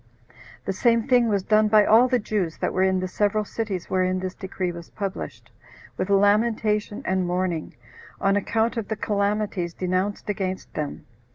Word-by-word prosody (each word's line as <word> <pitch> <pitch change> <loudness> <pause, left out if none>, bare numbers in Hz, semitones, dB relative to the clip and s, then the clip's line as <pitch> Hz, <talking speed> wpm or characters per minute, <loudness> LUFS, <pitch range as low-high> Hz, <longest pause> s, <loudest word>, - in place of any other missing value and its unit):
The 195 - -1
same 230 +2 +2
thing 245 -3 +4
was 200 -3 +1
done 215 +1 +4
by 210 -1 +5
all 230 +4 +6
the 255 0 +2
Jews 205 -7 -2
that - - -2
were 185 - +1
in 190 -1 +2
the 185 - -2
several 210 +3 0
cities 200 -5 -4
wherein 185 0 +1
this 185 0 -4
decree 190 -2 -4
was 170 -1 -10
published, 200 -2 -6 0.4
with 185 - -3
lamentation 210 +1 +2
and 185 -1 0
mourning, 175 -3 -2 0.4
on 195 0 +2
account 225 +3 0
of 225 - -2
the 220 - -2
calamities 200 -4 -1
denounced 185 +2 -1
against 190 -2 -3
them. 150 -2 -4
200 Hz, 170 wpm, -24 LUFS, 185-215 Hz, 0.4 s, all